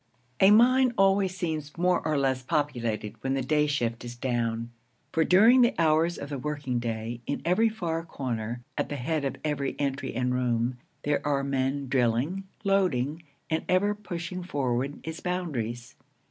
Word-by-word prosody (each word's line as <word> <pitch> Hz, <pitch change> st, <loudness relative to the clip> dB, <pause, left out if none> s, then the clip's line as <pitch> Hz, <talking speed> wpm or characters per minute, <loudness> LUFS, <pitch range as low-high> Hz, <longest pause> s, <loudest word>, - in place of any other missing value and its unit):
A 190 Hz, -, +7 dB
mine 250 Hz, +4 st, +5 dB
always 195 Hz, -1 st, +3 dB
seems 155 Hz, -4 st, -3 dB
more 180 Hz, +1 st, +2 dB
or 155 Hz, -2 st, 0 dB
less 135 Hz, -2 st, +1 dB
populated 120 Hz, -7 st, -1 dB
when 135 Hz, 0 st, 0 dB
the 135 Hz, -, -1 dB
day 150 Hz, +3 st, +2 dB
shift 120 Hz, -6 st, -1 dB
is 120 Hz, 0 st, -7 dB
down; 120 Hz, -2 st, -2 dB, 0.4 s
for 165 Hz, -, +2 dB
during 225 Hz, +10 st, +6 dB
the 240 Hz, +1 st, +4 dB
hours 165 Hz, +1 st, +3 dB
of 140 Hz, -, -6 dB
the 140 Hz, -2 st, -4 dB
working 140 Hz, -3 st, -2 dB
day, 115 Hz, 0 st, -4 dB
in 140 Hz, -, -1 dB
every 215 Hz, +7 st, +3 dB
far 170 Hz, -7 st, -3 dB
corner, 120 Hz, -6 st, -4 dB, 0.2 s
at -, -, -1 dB
the 145 Hz, -, -3 dB
head 150 Hz, +3 st, -1 dB
of 135 Hz, -, -2 dB
every 140 Hz, -2 st, -1 dB
entry 140 Hz, -3 st, -2 dB
and 125 Hz, +1 st, 0 dB
room, 125 Hz, 0 st, 0 dB, 0.2 s
there 145 Hz, 0 st, +1 dB
are 140 Hz, -2 st, +1 dB
men 135 Hz, 0 st, -1 dB
drilling, 130 Hz, +9 st, +1 dB, 0.2 s
loading, 175 Hz, -, +1 dB, 0.3 s
and 160 Hz, -, -1 dB
ever 200 Hz, +3 st, +3 dB
pushing 180 Hz, -3 st, -5 dB
forward 140 Hz, -5 st, -2 dB
its 160 Hz, 0 st, -6 dB
boundaries. 125 Hz, -10 st, -3 dB
145 Hz, 165 wpm, -27 LUFS, 125-175 Hz, 0.4 s, A